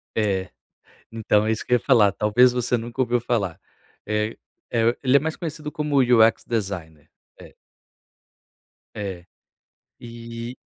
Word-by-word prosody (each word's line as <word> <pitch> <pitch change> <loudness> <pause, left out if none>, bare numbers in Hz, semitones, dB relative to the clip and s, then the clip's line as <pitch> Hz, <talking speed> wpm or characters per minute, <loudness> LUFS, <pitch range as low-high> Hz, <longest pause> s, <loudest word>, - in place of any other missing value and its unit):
É. 100 -4 0 0.6
Então 110 -1 +1
é - - +2
isso 110 - -3
que 125 - 0
eu - - +6
ia - - -6
falar, 110 -7 +4
talvez 115 +5 +3
você 125 0 0
nunca 120 +3 -4
ouviu 120 -1 +1
falar. 105 -8 -2 0.5
Eh, 105 +1 -2 0.3
eh, 115 0 +2
ele 130 +2 +5
é - - +3
mais 160 +2 -3
conhecido 155 -2 -6
como 150 -2 -1
UX 115 -3 +4
Designer. 90 -9 -5 0.3
É. - - -14 1.4
É. 95 -5 -6 0.7
E 115 +1 -8
115 Hz, 140 wpm, -23 LUFS, 105-125 Hz, 1.4 s, eu